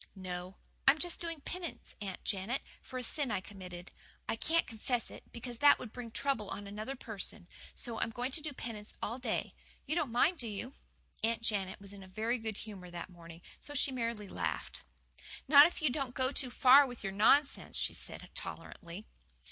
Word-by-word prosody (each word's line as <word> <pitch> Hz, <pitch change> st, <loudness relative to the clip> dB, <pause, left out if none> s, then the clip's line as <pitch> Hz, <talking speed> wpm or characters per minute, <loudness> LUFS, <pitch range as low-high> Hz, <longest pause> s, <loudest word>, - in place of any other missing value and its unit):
"No. 185 Hz, 0 st, -5 dB, 0.3 s
I 270 Hz, -, +10 dB
am -, -, -10 dB
just 350 Hz, +2 st, +4 dB
doing 330 Hz, -3 st, -4 dB
penance, 350 Hz, +2 st, -5 dB
Aunt 195 Hz, -3 st, -5 dB
Janet, 210 Hz, +6 st, -1 dB, 0.2 s
for 255 Hz, -, -7 dB
a 250 Hz, -, -3 dB
sin 280 Hz, +2 st, +2 dB
I 205 Hz, -3 st, +1 dB
committed. 185 Hz, -2 st, -9 dB, 0.4 s
I -, -, 0 dB
can't 330 Hz, +8 st, +3 dB
confess 230 Hz, +1 st, -1 dB
it, -, -, -12 dB
because 240 Hz, 0 st, -6 dB
that 290 Hz, 0 st, +8 dB
would 230 Hz, -, -8 dB
bring 245 Hz, -1 st, -6 dB
trouble 225 Hz, -4 st, 0 dB
on 205 Hz, -, -5 dB
another 215 Hz, +6 st, -4 dB
person. 210 Hz, -5 st, -4 dB, 0.3 s
So 230 Hz, -2 st, -2 dB
I'm -, -, +1 dB
going 245 Hz, +3 st, -3 dB
to 310 Hz, -, 0 dB
do 305 Hz, 0 st, -4 dB
penance 225 Hz, -5 st, -5 dB
all 235 Hz, +4 st, -2 dB
day. 245 Hz, -4 st, -1 dB, 0.3 s
You 295 Hz, -, -1 dB
don't 310 Hz, -7 st, 0 dB
mind, 305 Hz, +8 st, +3 dB
do 235 Hz, -, -3 dB
you?" 220 Hz, +5 st, -5 dB, 0.5 s
Aunt 230 Hz, +1 st, +1 dB
Janet 195 Hz, -4 st, +1 dB
was 200 Hz, 0 st, -9 dB
in 200 Hz, -, -10 dB
a 190 Hz, -, -11 dB
very 225 Hz, +6 st, -1 dB
good 220 Hz, -2 st, -4 dB
humour 195 Hz, -5 st, -8 dB
that 175 Hz, +2 st, -6 dB
morning, 170 Hz, 0 st, -12 dB, 0.2 s
so 290 Hz, -, -4 dB
she 275 Hz, -, +2 dB
merely 230 Hz, -4 st, -2 dB
laughed. -, -, -3 dB, 0.7 s
"Not 285 Hz, +1 st, +10 dB
if 340 Hz, -, -7 dB
you 290 Hz, -, +4 dB
don't 260 Hz, -2 st, -2 dB
go 260 Hz, 0 st, +1 dB
too 265 Hz, -2 st, +2 dB
far 265 Hz, +3 st, +8 dB
with 245 Hz, -3 st, -7 dB
your 195 Hz, -1 st, -2 dB
nonsense," 275 Hz, +8 st, +4 dB
she -, -, +1 dB
said -, -, -6 dB
tolerantly. 175 Hz, +5 st, -7 dB
230 Hz, 200 wpm, -34 LUFS, 200-270 Hz, 0.7 s, I